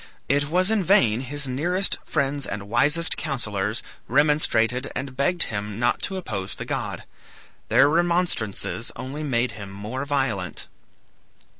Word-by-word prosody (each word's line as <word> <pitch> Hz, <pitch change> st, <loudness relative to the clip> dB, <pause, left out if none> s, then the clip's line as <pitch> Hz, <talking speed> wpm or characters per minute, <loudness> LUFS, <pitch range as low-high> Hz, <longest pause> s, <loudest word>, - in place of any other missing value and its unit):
It 145 Hz, +1 st, +1 dB
was 185 Hz, +5 st, +3 dB
in 215 Hz, -3 st, +2 dB
vain 125 Hz, -, +4 dB
his 140 Hz, +2 st, -2 dB
nearest 175 Hz, +9 st, +1 dB
friends 140 Hz, -2 st, -1 dB
and 100 Hz, -1 st, -5 dB
wisest 145 Hz, +9 st, +3 dB
counsellors 110 Hz, -7 st, -2 dB, 0.2 s
remonstrated 130 Hz, -3 st, +2 dB
and 135 Hz, 0 st, -4 dB
begged 155 Hz, +7 st, +2 dB
him 105 Hz, -1 st, -4 dB
not 120 Hz, 0 st, +1 dB
to 190 Hz, -, -2 dB
oppose 100 Hz, -, -4 dB
the -, -, -6 dB
god. -, -, -3 dB, 0.7 s
Their 130 Hz, +5 st, +6 dB
remonstrances 170 Hz, -, 0 dB
only 135 Hz, +4 st, -5 dB
made 125 Hz, -4 st, 0 dB
him 105 Hz, -2 st, -8 dB
more 105 Hz, +7 st, -5 dB
violent. 120 Hz, -, -1 dB
135 Hz, 135 wpm, -24 LUFS, 110-150 Hz, 0.7 s, Their